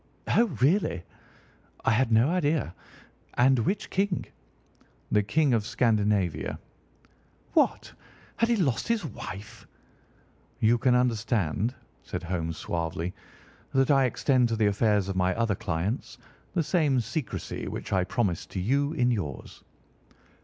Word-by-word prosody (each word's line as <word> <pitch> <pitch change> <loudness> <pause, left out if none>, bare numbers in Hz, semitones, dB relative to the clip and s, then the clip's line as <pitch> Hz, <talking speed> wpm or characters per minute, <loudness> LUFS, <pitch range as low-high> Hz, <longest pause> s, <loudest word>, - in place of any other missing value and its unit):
"Oh, 235 - +4 0.2
really! 135 - +2 0.8
I - - +4
had 120 +1 +2
no 115 +5 +5
idea. 155 - 0 0.6
And 130 +1 +4
which 195 - -1
king?" 195 -1 0 0.9
"The 105 - +4
King 140 +6 +2
of 110 -3 +2
Scandinavia." 105 - +1 1.0
"What! - - +2 0.4
Had 230 - +2
he 235 - +4
lost 145 - 0
his 230 -6 0
wife?" 105 -5 -8 0.9
"You 115 +2 +3
can 125 0 +3
understand," 115 - 0 0.3
said - - -6
Holmes 85 -2 -3
suavely, 85 +1 -3 0.6
"that 135 +1 +4
I 135 -2 +5
extend 125 -1 +2
to 115 - 0
the 110 -1 +2
affairs 105 -2 +2
of 95 - -3
my 90 0 +1
other 115 -2 +1
clients 95 +5 -3 0.4
the 170 - +2
same 150 -6 +2
secrecy 140 +4 -4
which - - -5
I 95 -1 +3
promise 90 -2 -1
to 95 - -5
you 140 - +1
in 125 -5 +2
yours." 90 - -5
115 Hz, 130 wpm, -27 LUFS, 100-140 Hz, 1.0 s, no